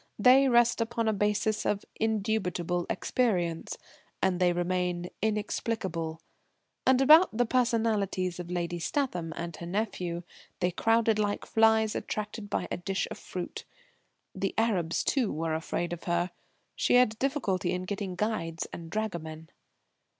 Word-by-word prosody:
They 260 +5 +6
rest 240 -1 +4
upon 230 0 -1
a 220 - +3
basis 210 +1 +1
of 205 -1 -1
indubitable 195 -6 -1
experience; 175 -10 0 0.4
and 185 -2 +1
they 180 -1 +4
remain 175 0 -1
inexplicable. 205 -6 -2 0.7
And 260 0 +5
about 305 -2 +7
the 245 - +3
personalities 220 -7 +1
of 175 -1 -6
Lady 175 -1 -2
Statham 180 - -1
and 170 -1 -5
her 170 - -7
nephew 180 -3 -2 0.4
they 180 0 +1
crowded 225 +3 +2
like 205 -1 -1
flies 220 -1 +3
attracted 210 0 -4
by - - -1
a - - -1
dish 190 +2 -2
of - - -6
fruit. 180 -1 -6 0.7
The - - -2
Arabs, 190 -8 +1
too, 255 -7 +1
were 160 +1 -2
afraid 170 +2 -2
of 175 - -8
her. 175 +1 0 0.4
She - - +2
had 235 -3 +4
difficulty 210 -11 0
in 180 0 -2
getting 195 -1 -4
guides 175 -5 -2
and 165 -1 -7
dragomen. 165 -6 -4
200 Hz, 140 wpm, -29 LUFS, 175-225 Hz, 0.7 s, about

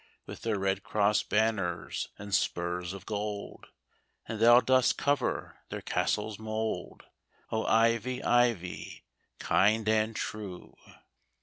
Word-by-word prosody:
With - - -9
their 110 -3 -1
red 95 0 0
cross 105 +1 +2
banners 105 -5 -1
and 100 0 -8
spurs 90 -1 0
of 95 -1 -9
gold. 105 -1 -5 0.6
And 115 - -5
thou 120 +2 +8
dost 130 0 +3
cover 145 0 -1
their - - -6
castle 105 +1 0
s 105 - -9
mould, 110 0 -4 0.5
O, 110 0 -1
Ivy, 115 +2 +2
Ivy, 120 -7 0 0.3
kind 105 +6 +2
and 110 0 +2
true 100 -5 -6
110 Hz, 120 wpm, -30 LUFS, 100-115 Hz, 0.6 s, thou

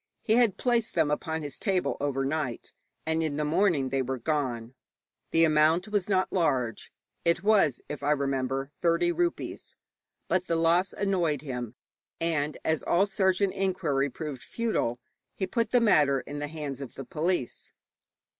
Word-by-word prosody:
He 220 - +2
had 230 -4 +4
placed 240 -3 +1
them 145 - +2
upon 160 +1 -2
his 145 -2 -6
table 190 -4 0
overnight, 140 -1 -2 0.3
and 160 0 0
in 155 -3 -1
the 150 - 0
morning 155 -4 +2
they 135 0 0
were 130 +1 -2
gone. 125 -4 -2 0.6
The 165 - +4
amount 160 +4 +3
was 205 -2 0
not 185 -1 +1
large. 130 -10 0 0.3
It 170 +1 +1
was, 200 - +3
if 150 - -6
I 145 - 0
remember 135 -2 0
rightly, 140 +2 -19
thirty 170 - +3
rupees; 345 0 -2 0.5
but 185 -1 0
the 165 - +1
loss 170 +3 +3
annoyed 175 -8 0
him, 125 -4 -5 0.4
and 155 -3 -1
as 160 -1 +1
all 180 +3 +3
search 190 -1 +1
and 195 -2 +2
inquiry 175 -8 0
proved 140 -1 -6
futile, 220 - -1 0.4
he 190 - -1
put 230 +3 -1
the 245 - +4
matter 150 - +4
in 145 +2 -7
the 145 - -3
hands 145 -3 -6
of 135 - -8
the 135 - -7
police. 160 -1 -2
160 Hz, 165 wpm, -28 LUFS, 140-190 Hz, 0.6 s, had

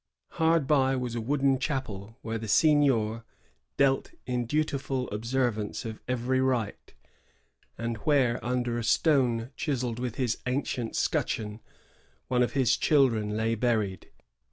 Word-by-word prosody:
Hard 160 -2 +2
by 135 -2 +3
was 125 -2 -3
a 115 - -2
wooden 135 +2 +1
chapel, 115 -7 -4
where 115 0 -3
the 110 - -6
seignior 120 -5 +3 0.5
knelt 135 -1 +2 0.2
in 125 -1 -2
dutiful 140 -3 -1
observance 115 -1 -1
of 110 -1 -6
every 125 +1 0
rite, 125 -5 -2 0.8
and 115 0 -3
where, 125 0 +1
under 120 -1 -1
a - - -3
stone 125 -3 +2
chiselled 125 -6 -2
with 125 -2 -3
his 125 -4 -1
ancient 125 -3 -2
scutcheon, 105 0 -1 0.7
one 125 -1 +2
of 125 - +1
his 130 -5 +3
children 115 -8 +2
lay 110 +1 +1
buried. 110 -5 -1
125 Hz, 130 wpm, -28 LUFS, 115-135 Hz, 0.8 s, by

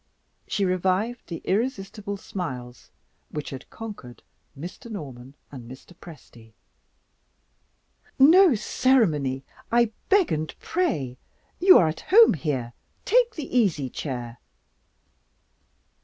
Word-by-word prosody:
She 200 - 0
revived 190 +6 -1
the 165 - -7
irresistible 205 -2 -2
smiles 130 -12 -7 0.4
which 150 -1 -6
had 135 -1 -9
conquered 205 - -10 0.3
Mr. 175 +9 -9
Norman 135 - -8 0.2
and 125 -4 -10
Mr. 130 +7 -13
Presty. 120 -10 -15 1.6
"No 325 +3 +7
ceremony, 165 - +1 0.3
I 235 -1 +3 0.2
beg 395 -3 +4
and 155 0 -3
pray! 150 - -2 0.4
You 370 +1 +8
are 165 - +4
at 155 +1 -5
home 450 +4 +7
here 130 -6 -3 0.3
take 480 -1 +3
the 295 -5 -6
easy 160 - +1
chair!" 120 -4 -6
180 Hz, 105 wpm, -25 LUFS, -, 1.6 s, You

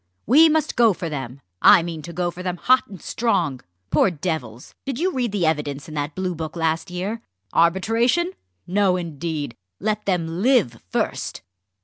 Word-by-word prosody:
We 310 +8 +7
must 310 -1 +1
go 230 -4 +5
for 170 -1 -5
them! 135 -2 -6 0.2
I 170 - +8
mean 165 -2 -5
to 170 - -8
go 175 +1 -1
for 180 +1 -9
them 180 -1 -3
hot 255 +7 +3
and 195 -3 -10
strong. 145 - 0 0.3
Poor - - +4
devils! 145 -9 -4
did 270 -3 -4
you 365 +5 0
read 245 -4 -1
the 195 -4 0
evidence 150 -3 -1
in 155 - -9
that 145 0 -3
Bluebook 175 -4 -3
last 165 +2 -1
year? 195 +6 -4 0.3
Arbitration? 225 - +2 0.3
no, 190 0 +2
indeed! 155 -5 -4 0.2
let 215 +1 -2
them 170 -2 -1
live 225 - +3
first!" - - -2
180 Hz, 165 wpm, -22 LUFS, 155-215 Hz, 0.3 s, I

